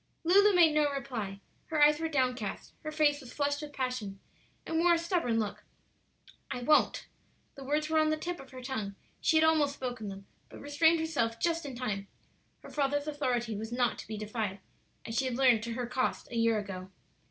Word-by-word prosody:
Lulu 395 +4 +5
made 330 -3 +6
no 300 -1 +3
reply; 245 -8 -4 0.3
her 315 - -1
eyes 300 +1 +5
were 325 0 -1
downcast, 250 -7 -1
her 310 - -5
face 295 -1 +2
was 255 - -11
flushed 285 0 0
with 300 -1 -7
passion, 250 -8 -3 0.5
and 320 - -1
wore 345 0 +5
a - - +1
stubborn 335 -9 0
look. 215 -2 -2 0.9
"I 245 - -4
won't;" 305 - +3 0.5
the 275 - -10
words 300 +3 0
were 315 0 +2
on 310 0 +3
the 310 - +1
tip 345 +2 -4
of 270 - -12
her 255 -1 -10
tongue; 220 -7 -4 0.3
she 320 - +3
had 315 - +5
almost 305 -3 +3
spoken 245 -5 -5
them, 195 0 -8 0.2
but - - -11
restrained 320 +3 +3
herself 255 -8 -1
just 335 -3 0
in 265 - -6
time; 210 -5 -3 0.6
her - - -11
father's 290 0 0
authority 250 -7 -1
was 220 +2 -5
not 240 -1 +1
to - - -8
be 215 0 -5
defied, 215 -2 -3 0.5
as 225 - -5
she 265 - +1
had 250 -2 -2
learned 250 -5 +5
to 235 - -3
her 245 +1 -3
cost 250 0 -2
a - - -5
year 230 -1 +3
ago. 190 -3 -5
265 Hz, 205 wpm, -31 LUFS, 230-305 Hz, 0.9 s, made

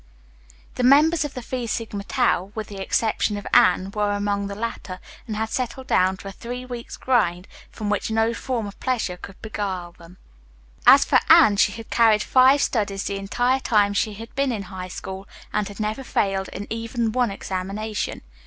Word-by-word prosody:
The 250 - 0
members 300 +5 +5
of 285 - -7
the 250 - -6
Phi 245 0 -4
Sigma 220 -3 -3
Tau, 200 -5 0
with 220 -1 -5
the 200 -2 -7
exception 210 +1 0
of 205 - -8
Anne, 185 +1 +4
were 205 0 0
among 205 0 -1
the 200 - -6
latter, 200 -4 -5 0.3
and 215 - -4
had 220 +1 -2
settled 255 +1 -3
down 185 -5 +2
to 195 - -10
a - - -5
three 245 +5 -7
weeks' 245 -2 -7
grind, 190 -8 +1 0.2
from 215 - -6
which 205 - -1
no 225 +1 +1
form 235 -1 -3
of 200 - -9
pleasure 240 -8 -1
could 190 +2 -12
beguile 195 -5 -4
them. 170 +1 -16 0.7
As - - +8
for - - +4
Anne, 205 -2 +7
she 205 - +3
had 225 0 -10
carried 220 -2 +4
five 265 +2 +5
studies 200 -4 -1
the 200 - -3
entire 245 +7 0
time 205 -5 +2
she 210 +1 0
had 225 +3 -10
been 275 -1 0
in 210 -4 -3
High 185 -1 -5
School 190 +1 -7 0.3
and 210 -1 0
had 205 - -10
never 215 +5 -2
failed 195 -5 0
in 200 - -7
even 230 0 -2
one 245 0 +1
examination. 200 +2 -4
215 Hz, 190 wpm, -23 LUFS, 195-235 Hz, 0.7 s, As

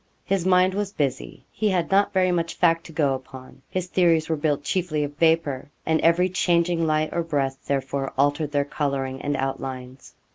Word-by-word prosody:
His 190 -2 0
mind 185 0 +4
was 200 0 -3
busy. 135 -6 -3
He 215 - 0
had 180 -3 0
not 200 +1 +3
very 185 -1 +2
much 170 -1 -1
fact 165 -1 +2
to - - -11
go 150 -4 +1
upon. 130 0 -10
His 185 -1 -2
theories 170 -3 +2
were 160 - +1
built 145 -1 -1
chiefly 165 -3 -1
of 145 0 -5
vapour, 160 -5 +1 0.2
and 160 0 +1
every 170 +2 +4
changing 170 -2 +1
light 155 0 0
or 170 - 0
breath, 140 -5 -2
therefore, 135 0 -2
altered 145 +2 +1
their 145 -1 +1
colouring 135 -3 -3
and 145 -1 -1
outlines. 130 -1 -5
155 Hz, 185 wpm, -24 LUFS, 140-175 Hz, 0.2 s, mind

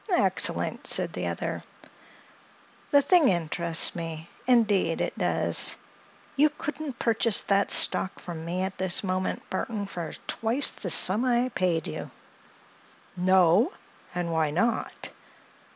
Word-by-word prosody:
"Excellent!" 355 - 0
said - - 0
the - - -4
other. - - -4 1.3
"The 285 -2 +4
thing 335 0 +4
interests 170 -1 +2
me—indeed 170 +3 0
it - - -2
does. - - +1 0.6
You 300 +2 +4
couldn't 295 -3 -5
purchase 230 -2 +2
that 200 0 +1
stock 190 - +2
from 165 -2 -8
me 175 +3 -3
at 190 0 -5
this 190 0 +1
moment, 185 -1 -3
Burthon, 205 +2 -3
for 175 -4 -6
twice 235 +5 0
the 185 - -7
sum 190 +7 +5
I 250 0 +1
paid 175 -7 -1
you." - - -6 1.1
"No? 185 - +3 0.4
And 175 -1 -2
why 160 -2 +1
not?" 200 +10 -2
190 Hz, 120 wpm, -26 LUFS, 170-235 Hz, 1.3 s, sum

